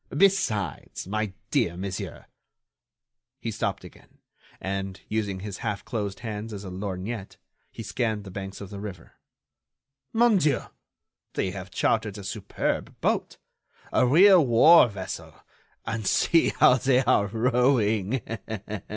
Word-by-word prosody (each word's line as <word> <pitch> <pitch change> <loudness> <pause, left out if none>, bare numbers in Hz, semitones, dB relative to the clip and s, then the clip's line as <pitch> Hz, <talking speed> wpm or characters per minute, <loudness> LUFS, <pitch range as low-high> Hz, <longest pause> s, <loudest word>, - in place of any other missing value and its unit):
Besides, 175 - +1
my 110 +1 -2 0.2
dear 85 0 +1
monsieur—" 95 0 -5 1.1
He - - -3
stopped - - -2
again - - -16 0.4
and, 95 0 -4
using 105 -3 -2
his 100 -1 -6
half 105 - -3
closed 105 -5 -4
hands 110 -1 -5
as 100 -1 -6
a 95 - -6
lorgnette, 95 +2 -5 0.3
he - - -8
scanned 110 -4 -2
the 95 - -10
banks 95 +1 -7
of 100 0 -8
the 100 - -6
river. 95 -5 -8 1.0
"Mon 230 -2 +4
Dieu! 150 -7 +2 0.7
they 95 - 0
have 95 0 -7
chartered 105 +1 0
a 100 - -8
superb - - -3
boat, - - -1 0.6
a - - +4
real 180 +5 +7
war 135 +5 +7
vessel, 100 -3 -7 0.5
and 110 -3 -3
see 165 - +3
how 125 - +5
they 130 0 +3
are 115 -5 +3
rowing. 115 -1 +1
105 Hz, 130 wpm, -26 LUFS, 95-125 Hz, 1.1 s, real